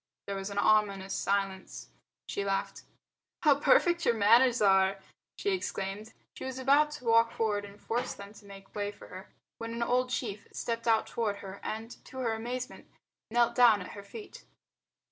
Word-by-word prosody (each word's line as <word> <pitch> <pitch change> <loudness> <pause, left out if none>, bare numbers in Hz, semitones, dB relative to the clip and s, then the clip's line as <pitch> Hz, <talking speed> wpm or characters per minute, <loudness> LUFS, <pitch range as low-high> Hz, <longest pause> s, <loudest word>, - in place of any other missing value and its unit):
There 200 - -4
was 195 +1 -4
an 200 - -7
ominous 200 -2 +2
silence. 195 -1 -2 0.4
She 200 - -2
laughed. 195 0 -2 0.6
"How 290 -3 +5
perfect 345 -3 +4
your 235 - +3
manners 235 +4 +5
are!" 195 -1 +4 0.4
she 405 - 0
exclaimed. 210 - -4 0.2
She - - -8
was 260 -1 -5
about 280 +3 +4
to 250 - -9
walk 230 0 +4
forward 210 -2 -1
and 200 +1 -13
force 240 +4 -2
them 200 +1 -10
to 215 - -16
make 195 -1 -13
way 205 -1 -2
for - - -14
her 185 +2 -10 0.3
when 230 0 -5
an 235 - -1
old 250 +1 +1
chief 215 -5 -4
stepped 230 0 -3
out 225 -1 +4
toward 220 -3 -2
her 195 +1 -8
and, 225 +2 -6
to 260 - -11
her 240 -3 0
amazement, 245 +3 -5 0.4
knelt 235 +1 +3
down 235 -4 +6
at 180 - -7
her 205 - -8
feet. 410 - -11
220 Hz, 180 wpm, -30 LUFS, 200-245 Hz, 0.6 s, down